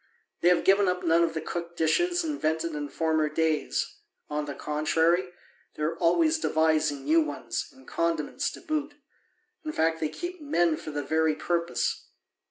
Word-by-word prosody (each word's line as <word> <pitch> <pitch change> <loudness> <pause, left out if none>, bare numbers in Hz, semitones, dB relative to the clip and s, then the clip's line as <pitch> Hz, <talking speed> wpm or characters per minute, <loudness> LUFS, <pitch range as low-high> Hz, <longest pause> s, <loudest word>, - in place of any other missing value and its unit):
They - - +3
have 180 - +3
given 195 +1 +4
up 180 0 0
none 165 0 +4
of 165 -1 +1
the 160 - -2
cooked 170 +1 -5
dishes 350 - +2
invented 165 - -1
in 145 -1 -4
former 160 -1 +1
days; 160 0 -1 0.3
on 150 0 -1
the 145 -1 -6
contrary, 165 +4 +1 0.5
they 150 - -4
are 160 +2 0
always 315 - +3
devising 155 - +1
new 160 +3 +5
ones, 130 -6 -3
and 130 0 -19
condiments 165 - -1
to - - -10
boot: 300 -1 -2 0.7
in 310 - -3
fact, 165 - +1
they 155 - -1
keep 350 - -6
men 175 - +2
for 155 - -8
the 145 -1 -3
very 160 +1 +1
purpose. 170 +1 -1
165 Hz, 170 wpm, -27 LUFS, 155-180 Hz, 0.7 s, new